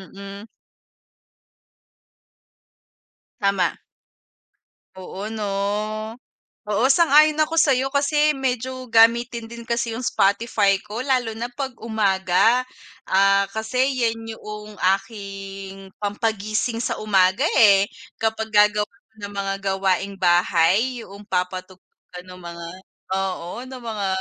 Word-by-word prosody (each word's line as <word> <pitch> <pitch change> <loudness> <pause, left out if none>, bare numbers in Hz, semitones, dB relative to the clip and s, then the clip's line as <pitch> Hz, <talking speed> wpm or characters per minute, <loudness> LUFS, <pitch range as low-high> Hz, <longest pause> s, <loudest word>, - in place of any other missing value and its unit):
mm. 200 +2 -9 2.9
Tama. 200 -3 +1 1.2
Oo 190 +2 -7
'no? 220 -1 -5 1.2
Oo 210 +4 +1
sang-ayon 305 0 +5
ako 310 +1 +1
sa'yo 270 -4 +3
kasi 295 +1 +2
medyo 255 -1 -3
gamitin 235 +1 +4
din 235 0 -9
kasi 235 -1 -2
yung 250 - -5
Spotify 200 -1 +2
ko 210 +3 -6
lalo 255 -3 0
na 235 +2 -3
pag 265 +1 -4
umaga. 215 +2 +2 0.4
Ah, 195 +1 +4
kasi 220 +3 -3 0.2
'yan 225 -1 0 0.2
yuong 210 0 -9 0.2
aking 195 -2 -9
pampagising 215 +2 -1
sa - - -2
umaga, 190 -2 +3 0.2
eh, 200 -2 +6 0.3
kapag 220 0 -1
gagawa 210 0 +4 0.3
na 205 -1 -6
ng 205 - -12
mga 195 0 -2 0.2
gawaing 195 +1 0
bahay 180 +7 +3
yuong 200 +2 -12
papatugtog 185 0 -3 0.3
ka 180 - -7
ng 185 0 -12
mga, 170 -1 -8 0.5
oo 185 -3 -3 0.2
ng 260 -1 -9
mga 215 -4 -3
210 Hz, 110 wpm, -22 LUFS, 195-235 Hz, 2.9 s, eh